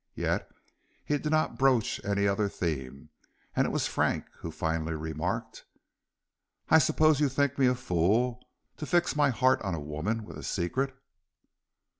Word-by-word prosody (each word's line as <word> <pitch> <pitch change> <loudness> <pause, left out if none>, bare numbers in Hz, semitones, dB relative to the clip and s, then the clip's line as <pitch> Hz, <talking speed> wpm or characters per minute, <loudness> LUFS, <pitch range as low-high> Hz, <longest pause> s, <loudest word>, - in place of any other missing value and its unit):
Yet - - -1 0.6
he 145 -1 0
did 150 - -3
not 155 -2 +1
broach 130 -4 +2
any 100 0 +1
other 100 +1 +1
theme, 70 -5 -4 0.5
and - - +2
it - - -1
was - - 0
Frank - - 0
who 85 - -6
finally 80 0 -2
remarked: 80 +1 -4 1.1
"I 160 - +7
suppose 155 +1 +3
you 145 -2 +3
think 140 +1 0
me 130 - +5
a 125 - +3
fool 120 +4 +1 0.3
to 150 - -6
fix 175 -3 +2
my 145 -1 +4
heart 130 +1 +2
on 95 -4 -2
a - - -4
woman 75 +10 -3
with - - -9
a - - -9
secret." 130 +9 -1
115 Hz, 160 wpm, -29 LUFS, 85-135 Hz, 1.1 s, I